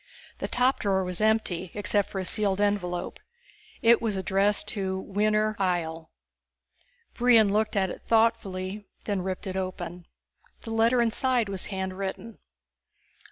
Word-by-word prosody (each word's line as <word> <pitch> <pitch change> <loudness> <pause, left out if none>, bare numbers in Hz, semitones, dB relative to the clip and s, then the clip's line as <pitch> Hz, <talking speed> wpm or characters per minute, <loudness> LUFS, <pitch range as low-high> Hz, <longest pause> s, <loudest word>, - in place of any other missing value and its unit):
The - - -2
top 250 +2 +2
drawer 190 -2 +1
was 180 0 -2
empty, 215 -5 +1
except 205 0 +1
for - - -6
a 190 - -2
sealed 200 -1 0
envelope. 200 -4 -1 0.6
It 235 0 +6
was 220 -3 -1
addressed 195 +2 +1
to 190 -3 -2
Winner 215 +2 0
Ihjel. 165 -4 -1 1.0
Brion 230 -4 +4
looked 215 +1 +1
at 190 -2 +1
it - - -9
thoughtfully, 210 -3 +1 0.2
then 200 -3 -1
ripped 185 0 -4
it 190 -1 -4
open. 180 -2 -5 0.5
The 225 - -7
letter 230 +2 +3
inside 235 -1 +1
was 195 -2 -2
handwritten. 190 +3 -5
200 Hz, 135 wpm, -27 LUFS, 185-220 Hz, 1.0 s, It